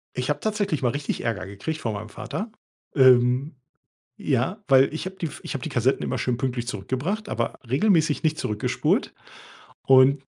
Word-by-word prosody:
Ich 125 +2 -2
habe 150 - 0
tatsächlich 210 -9 -1
mal 120 - +3
richtig 145 +2 -3
Ärger 115 -5 -2
gekriegt 100 +11 -5
von 110 -2 -2
meinem 105 +1 -6
Vater. 215 - -6 0.4
Ähm, 130 +2 +4 0.6
ja 190 - -1
weil 135 +2 +5
ich 160 - -4
habe 190 - -8
die 165 -4 -3
ich - - -6
habe 130 - -4
die - - -4
Kassetten 125 +2 +1
immer 130 - -2
schön 120 +1 0
pünktlich 120 -2 -2
zurückgebracht, 140 - -3
aber - - -3
regelmäßig 155 - +2
nicht 155 0 +1
zurückgespult. 105 -1 0 0.7
Und 135 +1 +5
135 Hz, 170 wpm, -24 LUFS, 120-160 Hz, 0.7 s, weil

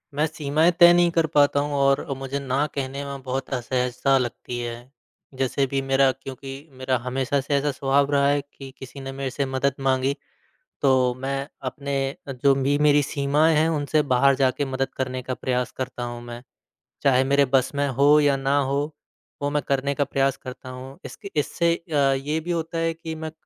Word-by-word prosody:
मैं 150 - +2
सीमाएँ 155 +2 +1
तय 175 -1 +9
नहीं 175 0 +4
कर 165 -1 +2
पाता 145 -1 +4
हूँ 145 0 -2
और 140 0 +3
अ, - - 0
मुझे 135 +1 -4
ना 135 +1 0
कहने 140 0 -3
में 140 -1 -6
बहुत 130 +1 -3
असहज़ता 125 +2 +1
लगती 120 -1 -4
है, 120 -1 -3 0.6
जैसे 130 +1 0
अभी 135 +1 -1
मेरा 135 0 +3
क्योंकि 135 0 -8 0.2
मेरा 130 0 0
हमेशा 130 +2 -1
से 140 +2 -3
ऐसा 140 +1 +1
स्वभाव 140 +1 +1
रहा 140 -1 +3
है 145 0 +2
कि 135 -1 -12
किसी 135 +1 -10
ने 135 0 -6
मेरे 135 0 -4
से 140 +2 -1
मदद 130 +1 0
माँगी, 135 0 +1 0.7
तो 130 -2 +3
मैं 135 +1 -3 0.2
अपने 140 -1 -4 0.5
जो 140 -1 +6
भी 140 +1 +1
मेरी 145 -1 +5
सीमाएँ 145 +3 +2
हैं 155 +2 +3
उनसे 150 -1 +1
बाहर 135 +2 +4
जाके 135 +1 +1
मदद 135 0 -1
करने 130 -1 -2
का 130 +1 -4
प्रयास 125 -1 -2
करता 130 -1 -4
हूँ 120 0 -5
मैं, 120 0 -8 0.6
चाहे 130 -2 +4
मेरे 140 +1 +3
बस 130 -1 +3
में 145 0 +1
हो 140 +3 +4
या 145 -2 +3
ना 135 +1 +1
हो, 140 +2 0 0.5
वो 145 - 0
मैं 150 0 0
करने 140 +1 0
का 145 - +2
प्रयास 135 -1 0
करता 130 0 -9
हूँ। 130 +3 -9
इसक 205 - -9
इससे 170 +3 +1
अ, 165 -2 -7 0.2
ये 145 +4 -2
भी 170 +2 -4
होता 165 0 -2
है 165 0 0
कि 160 0 -7
मैं 160 0 -6
140 Hz, 195 wpm, -24 LUFS, 130-145 Hz, 0.7 s, तय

